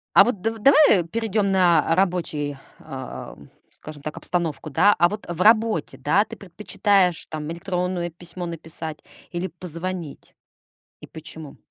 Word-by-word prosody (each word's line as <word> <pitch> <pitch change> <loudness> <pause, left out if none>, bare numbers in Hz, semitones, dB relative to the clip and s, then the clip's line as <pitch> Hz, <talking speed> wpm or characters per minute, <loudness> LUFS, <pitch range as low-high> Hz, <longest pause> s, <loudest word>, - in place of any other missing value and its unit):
А - - +10
вот 225 -6 -2
дав 225 +2 -2
давай, 275 -4 +6
э, - - 0
перейдём 210 +3 -1
на 180 -4 +3
рабочий, 165 -6 -1 0.2
э, - - -8 0.4
скажем 150 -2 -11
так, 155 - -5
обстановку, 170 -3 -3
да? 180 +8 +5
А 175 - +5
вот 210 +2 -6
в 175 0 -4
работе, 220 -5 +3
да, 190 +8 +3
ты 220 - -10
предпочитаешь 195 -1 +1
там 155 0 -5
электронное 180 0 -2
письмо 175 +1 -8
написать 160 -2 -7 0.3
или 175 +1 -2
позвонить? 175 -2 -7 0.7
И - - -10
почему? 160 -2 -10
175 Hz, 145 wpm, -23 LUFS, 160-200 Hz, 0.7 s, А